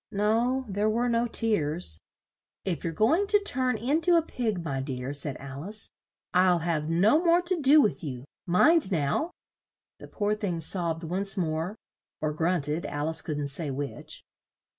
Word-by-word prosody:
No, 230 Hz, +6 st, +1 dB
there 205 Hz, +2 st, 0 dB
were 235 Hz, +3 st, +1 dB
no 235 Hz, 0 st, +1 dB
tears. 165 Hz, -, 0 dB, 0.7 s
"If 180 Hz, -4 st, -2 dB
you're 165 Hz, -, -1 dB
go 215 Hz, -, +2 dB
ing 400 Hz, +4 st, +1 dB
to 415 Hz, 0 st, +5 dB
turn 255 Hz, -, 0 dB
in 275 Hz, +9 st, 0 dB
to 345 Hz, +1 st, +4 dB
a 330 Hz, -, +3 dB
pig, 220 Hz, -, -3 dB
my 135 Hz, -4 st, -2 dB
dear," 130 Hz, 0 st, -4 dB
said 140 Hz, -1 st, -3 dB
Al 140 Hz, +3 st, -8 dB
ice, 215 Hz, +2 st, -8 dB, 0.4 s
"I'll 180 Hz, -1 st, +4 dB
have 160 Hz, -2 st, -2 dB
no 205 Hz, -, +3 dB
more 340 Hz, 0 st, +5 dB
to 355 Hz, -2 st, -1 dB
do 285 Hz, +3 st, +6 dB
with 210 Hz, -6 st, 0 dB
you. 130 Hz, -4 st, -6 dB, 0.2 s
Mind 295 Hz, -, +4 dB
now!" 160 Hz, -, 0 dB, 0.7 s
The -, -, -10 dB
poor 205 Hz, 0 st, -1 dB
thing 200 Hz, -5 st, -2 dB
sobbed 165 Hz, 0 st, -1 dB
once 195 Hz, +5 st, 0 dB
more 165 Hz, +2 st, -2 dB, 0.4 s
(or 155 Hz, -1 st, -1 dB
grunted, 160 Hz, -1 st, -1 dB
Al 145 Hz, +2 st, -2 dB
ice 160 Hz, -1 st, +2 dB
couldn't 145 Hz, -3 st, -3 dB
say 150 Hz, +2 st, 0 dB
which). 140 Hz, +1 st, -6 dB
180 Hz, 175 wpm, -27 LUFS, 155-235 Hz, 0.7 s, do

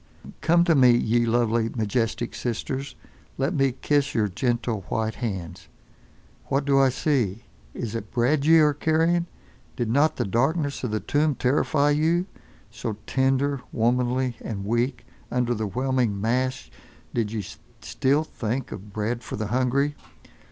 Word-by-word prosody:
Come 170 Hz, +1 st, +4 dB
to 175 Hz, -1 st, +3 dB
me, 130 Hz, -4 st, +6 dB
ye 120 Hz, +1 st, +1 dB
lovely, 115 Hz, -1 st, +2 dB
majestic 115 Hz, +1 st, -1 dB
Sisters. 130 Hz, +3 st, -4 dB, 0.4 s
Let 135 Hz, +6 st, 0 dB
me 135 Hz, -4 st, +2 dB
kiss 140 Hz, +2 st, 0 dB
your 110 Hz, -2 st, +2 dB
gentle 120 Hz, +1 st, -1 dB
white 110 Hz, 0 st, -1 dB
hands. 95 Hz, -8 st, -5 dB, 0.8 s
What 135 Hz, +1 st, 0 dB
do 140 Hz, -1 st, +4 dB
I 135 Hz, -1 st, +5 dB
see? 125 Hz, -6 st, 0 dB, 0.3 s
Is 115 Hz, -3 st, -4 dB
it 115 Hz, -2 st, -5 dB
bread 135 Hz, +4 st, +1 dB
ye 165 Hz, +2 st, +6 dB
are 150 Hz, -1 st, +4 dB
carrying? 165 Hz, +3 st, +1 dB, 0.5 s
Did 120 Hz, -3 st, -1 dB
not 145 Hz, +5 st, +3 dB
the -, -, -1 dB
darkness 140 Hz, -, 0 dB
of 125 Hz, -, -1 dB
the 110 Hz, 0 st, -1 dB
tomb 150 Hz, 0 st, +1 dB
terrify 145 Hz, +3 st, +2 dB
you—so 150 Hz, -, -2 dB
tender, 135 Hz, +2 st, +1 dB
womanly 125 Hz, +1 st, +1 dB
and 100 Hz, -3 st, -5 dB
weak; 120 Hz, +3 st, -1 dB, 0.2 s
under 125 Hz, -1 st, 0 dB
the 110 Hz, -2 st, -2 dB
whelming 125 Hz, -2 st, 0 dB
mass 125 Hz, -, -1 dB, 0.4 s
did 110 Hz, -3 st, -1 dB
ye 110 Hz, -4 st, -3 dB, 0.4 s
still 140 Hz, +4 st, +1 dB
think 125 Hz, -3 st, -4 dB
of 100 Hz, +1 st, -8 dB
bread 110 Hz, +4 st, -2 dB
for -, -, -6 dB
the 110 Hz, -1 st, -3 dB
hungry? 130 Hz, +4 st, +1 dB
125 Hz, 145 wpm, -25 LUFS, 115-140 Hz, 0.8 s, me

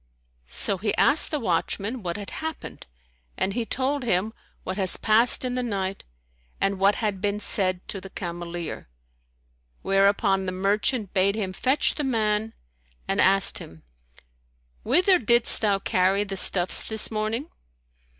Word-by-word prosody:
So 185 Hz, -, +3 dB
he 210 Hz, +2 st, -2 dB
asked 285 Hz, +3 st, +4 dB
the 300 Hz, -, -2 dB
watchman 210 Hz, +3 st, -2 dB
what 175 Hz, -2 st, -4 dB
had 205 Hz, -2 st, -8 dB
happened 320 Hz, -, -7 dB, 0.5 s
and 195 Hz, -, -1 dB
he 235 Hz, +1 st, -3 dB
told 270 Hz, +4 st, -2 dB
him 220 Hz, -2 st, -1 dB, 0.3 s
what 185 Hz, -, -5 dB
has 190 Hz, -2 st, +1 dB
passed 230 Hz, +4 st, +2 dB
in 250 Hz, -, -3 dB
the 250 Hz, -, -2 dB
night 195 Hz, -5 st, -4 dB, 0.6 s
and 195 Hz, -1 st, -1 dB
what 200 Hz, +1 st, +3 dB
had 205 Hz, -4 st, -3 dB
been 205 Hz, 0 st, -1 dB
said 185 Hz, -3 st, -1 dB
to 195 Hz, -, -6 dB
the 195 Hz, -, -10 dB
cameleer, 175 Hz, -, -7 dB, 1.0 s
whereupon 195 Hz, 0 st, +1 dB
the -, -, -2 dB
merchant 200 Hz, +3 st, -1 dB
bade 195 Hz, +2 st, +2 dB
him 195 Hz, -4 st, -4 dB
fetch 260 Hz, +9 st, 0 dB
the 300 Hz, -, -4 dB
man 220 Hz, -4 st, -1 dB, 0.5 s
and -, -, 0 dB
asked 195 Hz, +1 st, +3 dB
him, 80 Hz, -1 st, -13 dB, 1.0 s
"Whither 365 Hz, 0 st, +3 dB
didst 235 Hz, 0 st, +3 dB
thou 205 Hz, -3 st, +2 dB
carry 190 Hz, +1 st, +1 dB
the 195 Hz, -1 st, -6 dB
stuffs 180 Hz, -1 st, +5 dB
this 220 Hz, 0 st, +3 dB
morning?" 220 Hz, +7 st, -3 dB
205 Hz, 150 wpm, -24 LUFS, 190-230 Hz, 1.0 s, stuffs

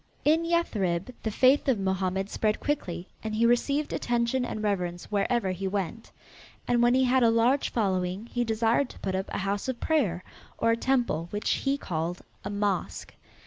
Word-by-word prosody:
In 315 Hz, +3 st, +4 dB
Yathrib 215 Hz, -, 0 dB
the 220 Hz, -, -2 dB
faith 260 Hz, +7 st, +4 dB
of 255 Hz, -6 st, +2 dB
Mohammed 190 Hz, 0 st, -1 dB
spread 215 Hz, 0 st, 0 dB
quickly 185 Hz, -11 st, -3 dB, 0.2 s
and 220 Hz, -1 st, -3 dB
he 230 Hz, +2 st, +3 dB
received 280 Hz, +5 st, +1 dB
attention 240 Hz, +1 st, 0 dB
and 215 Hz, -3 st, -4 dB
reverence 180 Hz, -4 st, -2 dB
wherever 205 Hz, 0 st, +1 dB
he 190 Hz, +1 st, -3 dB
went. 195 Hz, +3 st, -3 dB, 0.6 s
And 240 Hz, -1 st, +3 dB
when 240 Hz, +1 st, +4 dB
he 260 Hz, -, +4 dB
had 260 Hz, +1 st, +3 dB
a 235 Hz, -, +5 dB
large 235 Hz, +5 st, +3 dB
following 190 Hz, -2 st, -1 dB
he 240 Hz, 0 st, -1 dB
desired 230 Hz, +3 st, +1 dB
to -, -, -13 dB
put 190 Hz, -, -2 dB
up 190 Hz, 0 st, -2 dB
a -, -, -2 dB
house 200 Hz, +3 st, -2 dB
of 260 Hz, -2 st, -3 dB
prayer, 205 Hz, -, +1 dB, 0.3 s
or 230 Hz, -, +2 dB
a -, -, +3 dB
temple 235 Hz, -10 st, 0 dB
which 210 Hz, +2 st, -1 dB
he 275 Hz, 0 st, 0 dB
called 170 Hz, -, -3 dB, 0.2 s
a -, -, -4 dB
mosque. 200 Hz, -2 st, -2 dB
220 Hz, 185 wpm, -27 LUFS, 190-245 Hz, 0.6 s, a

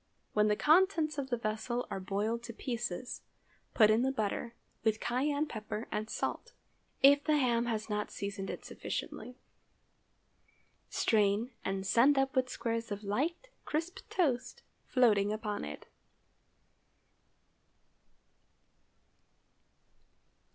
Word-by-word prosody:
When 210 Hz, 0 st, +4 dB
the 210 Hz, -, +3 dB
contents 315 Hz, -, +3 dB
of 265 Hz, -1 st, -3 dB
the 240 Hz, -, 0 dB
vessel 225 Hz, +2 st, -2 dB
are -, -, -2 dB
boiled 205 Hz, +5 st, -1 dB
to 230 Hz, -, -7 dB
pieces, 240 Hz, -1 st, -4 dB, 0.5 s
put 215 Hz, -2 st, +7 dB
in 220 Hz, +2 st, +4 dB
the 265 Hz, +1 st, +2 dB
butter, 230 Hz, 0 st, -2 dB, 0.3 s
with 220 Hz, -1 st, +2 dB
cayenne 285 Hz, +5 st, 0 dB
pepper 215 Hz, -3 st, -5 dB
and 215 Hz, +1 st, -2 dB
salt, -, -, -3 dB, 0.5 s
if 285 Hz, +1 st, +7 dB
the 305 Hz, -1 st, +3 dB
ham 240 Hz, -3 st, +2 dB
has 220 Hz, -2 st, -2 dB
not 210 Hz, -1 st, -2 dB
seasoned 200 Hz, -1 st, -5 dB
it -, -, -6 dB
sufficiently. 250 Hz, 0 st, -5 dB, 1.5 s
Strain 210 Hz, +2 st, +2 dB
and 195 Hz, 0 st, -2 dB
send 260 Hz, +8 st, +5 dB
up 270 Hz, 0 st, +1 dB
with 255 Hz, -1 st, +2 dB
squares 230 Hz, -2 st, -3 dB
of 205 Hz, +1 st, -4 dB
light, 310 Hz, -, -1 dB
crisp 335 Hz, +5 st, -3 dB
toast 270 Hz, -9 st, 0 dB, 0.2 s
floating 210 Hz, -5 st, +4 dB
upon 215 Hz, -1 st, -3 dB
it. 75 Hz, 0 st, -7 dB
235 Hz, 115 wpm, -32 LUFS, 210-270 Hz, 1.5 s, put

